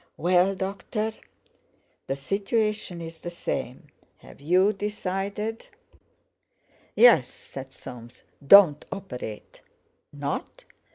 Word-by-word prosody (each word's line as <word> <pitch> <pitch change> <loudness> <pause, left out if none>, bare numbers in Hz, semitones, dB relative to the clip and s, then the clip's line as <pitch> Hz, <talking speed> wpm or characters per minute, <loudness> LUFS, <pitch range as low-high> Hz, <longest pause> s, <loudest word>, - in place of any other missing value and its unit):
"Well, 180 +2 +3
doctor?" 200 +3 -3 0.9
"The 135 - -1
situation's 195 - -2
the 175 - -6
same. 150 -3 -5 0.3
Have - - -16
you 185 +7 +3
decided?" 205 +2 -4 1.3
"Yes," 230 - +7
said 135 -1 -10
Soames; 125 -3 -11 0.2
"don't 165 -2 +7
operate!" 125 - -8 0.5
"Not? 145 -1 -5
185 Hz, 80 wpm, -26 LUFS, 140-205 Hz, 1.3 s, Yes